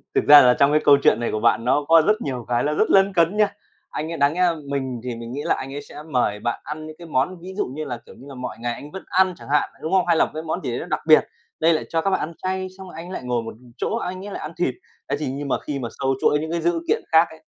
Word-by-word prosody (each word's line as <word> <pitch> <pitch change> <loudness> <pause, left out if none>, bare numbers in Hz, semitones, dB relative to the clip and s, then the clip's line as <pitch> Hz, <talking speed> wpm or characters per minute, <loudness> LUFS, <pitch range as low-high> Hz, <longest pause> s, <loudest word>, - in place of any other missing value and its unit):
Thực - - +2
ra 145 0 +11
là 125 -1 +6
trong 140 +1 +5
cái 150 +1 +3
câu 145 -1 +7
chuyện - - +4
này 120 - -2
của 110 - -1
bạn 115 0 +2
nó 145 +3 +2
có 165 0 +7
rất 215 +2 +2
nhiều 125 -4 -4
cái 120 0 +1
là 150 - 0
rất 215 - +1
lấn 195 0 +4
cấn 170 +3 +2
nha. 210 -1 +3 0.4
Anh 155 +2 -4
ấy 165 - -4
đáng 140 +1 +3
nhẽ 180 - -2
là 175 -2 +3
mình 130 -4 -3
thì 125 -2 -4
mình 115 +1 -8
nghĩ 140 - -4
là - - +1
anh 135 +1 -7
ấy 145 - -5
sẽ 150 +1 -11
mời 125 -9 0
bạn 120 +2 -2
ăn 155 +1 -7
những 155 - -9
cái 170 - -10
món 160 +5 -1
ví 185 +2 -8
dụ - - +1
như 150 +5 -6
là, 125 -4 -4
kiểu - - -14
như 135 - -14
là, 135 - -9
mọi 125 -2 -6
ngày 120 0 -2
anh 145 +5 -10
vẫn 190 - -8
ăn 185 0 +3
chẳng - - -13
hạn, 150 - +2
đúng 160 - -4
không? 190 -1 +4
Hay 170 - +4
là - - +4
một - - -10
cái 155 +1 -5
món 160 - -3
gì - - -2
đấy 120 - -3
nó - - -5
đặc 155 -3 -2
biệt. 155 - +6 0.3
Đây 165 +1 +4
lại 155 - -1
cho 165 -1 0
các 195 - 0
bạn 190 - +1
ăn 165 - -4
chay, 185 0 -2
xong 190 -1 -10
rồi - - -12
anh 165 - -7
ấy 185 - -8
lại - - -5
ngồi 120 -2 -1
một 115 - -7 0.2
chỗ - - -1
anh 185 -3 -4
ấy 205 - -7
lại - - -5
ăn 155 - -6
thịt. 135 -8 0 0.3
Thế 140 - +1
thì 145 -4 -2
nhưng 140 +1 -5
mà - - +1
khi 140 -2 -4
mà 120 - -4
xâu 135 0 +1
chuỗi 150 - +3
những 160 +2 -4
cái 170 - -1
dữ 170 0 +1
kiện - - +1
khác 165 +1 +6
ấy, 160 0 -15
150 Hz, 340 wpm, -22 LUFS, 130-170 Hz, 0.4 s, ra